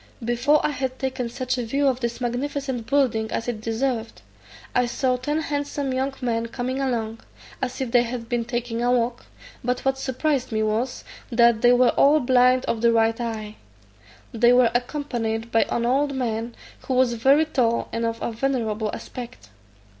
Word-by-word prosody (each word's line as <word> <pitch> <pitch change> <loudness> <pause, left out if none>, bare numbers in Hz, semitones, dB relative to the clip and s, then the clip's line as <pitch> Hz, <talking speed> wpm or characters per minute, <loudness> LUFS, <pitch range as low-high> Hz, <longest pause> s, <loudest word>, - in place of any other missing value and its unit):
Before 240 +6 +2
I - - +1
had 260 -2 -3
taken 260 -2 -3
such 255 +1 -2
a - - -1
view 275 +5 +1
of 260 -2 +1
this 235 -2 -3
magnificent 255 0 -3
building 245 -6 +1
as 230 - -3
it 230 -3 -3
deserved, 230 +1 -2 0.5
I 250 -1 +2
saw 255 +1 0
ten 295 +5 -2
handsome 285 -2 -2
young 265 +2 0
men 230 -2 -1
coming 255 +3 -3
along, 230 -4 -2 0.4
as 250 - -3
if 255 -3 -2
they 245 - +5
had 240 -1 -4
been 240 -1 -1
taking 240 -1 -3
a 245 +1 +2
walk; 240 0 0 0.4
but 250 +2 -2
what 265 0 +1
surprised 265 0 -1
me 220 0 0
was, 225 +4 -1 0.3
that 235 -1 +4
they 245 0 +6
were 245 0 +5
all 295 +2 +4
blind 255 -1 +4
of 225 - -1
the 235 0 +4
right 225 +1 +2
eye. 220 -2 -5 0.8
They 235 +1 +4
were 245 -1 +5
accompanied 240 -3 -2
by 225 - +3
an 235 - 0
old 275 +3 +1
man, 230 -2 -2 0.3
who 260 - 0
was 250 -1 +3
very 270 +7 +4
tall, 240 -6 0
and 230 - -1
of 230 0 -2
a - - -1
venerable 225 -3 -1
aspect. 235 - -9
245 Hz, 180 wpm, -24 LUFS, 230-265 Hz, 0.8 s, they